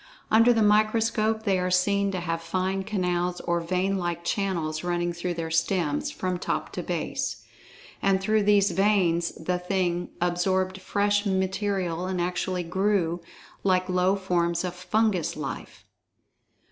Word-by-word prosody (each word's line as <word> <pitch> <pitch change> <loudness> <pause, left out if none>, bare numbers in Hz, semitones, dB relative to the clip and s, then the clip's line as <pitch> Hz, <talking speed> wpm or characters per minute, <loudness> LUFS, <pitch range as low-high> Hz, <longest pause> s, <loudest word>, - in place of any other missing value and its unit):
Under 230 +2 +6
the 225 -2 +3
microscope 220 +1 +2
they 195 -4 +2
are 180 0 0
seen 200 +2 +2
to 185 - -2
have 165 -1 -2
fine 185 +3 -1
canals 180 -3 -1
or 170 0 0
vein 185 +3 0
like 175 -1 -3
channels 170 -5 -1
running 175 0 -1
through 175 +1 -3
their 165 -1 -4
stems, 165 -2 0
from 185 -1 -3
top - - -2
to - - -4
base. - - -3 0.6
And 195 -1 +3
through 215 +3 +2
these 200 -1 +4
"veins" 180 -4 +2
the 180 +2 -2
"thing" 180 -1 -1
absorbed 185 +2 0
fresh 205 +2 +1
material 190 -2 -1
and 185 -1 -2
actually 180 +1 -1
"grew" 180 -1 0 0.4
like 185 -1 +2
low 180 +1 +2
forms 170 -3 0
of 180 -1 -3
fungus 185 0 0
life. - - -7
185 Hz, 145 wpm, -26 LUFS, 175-200 Hz, 0.6 s, Under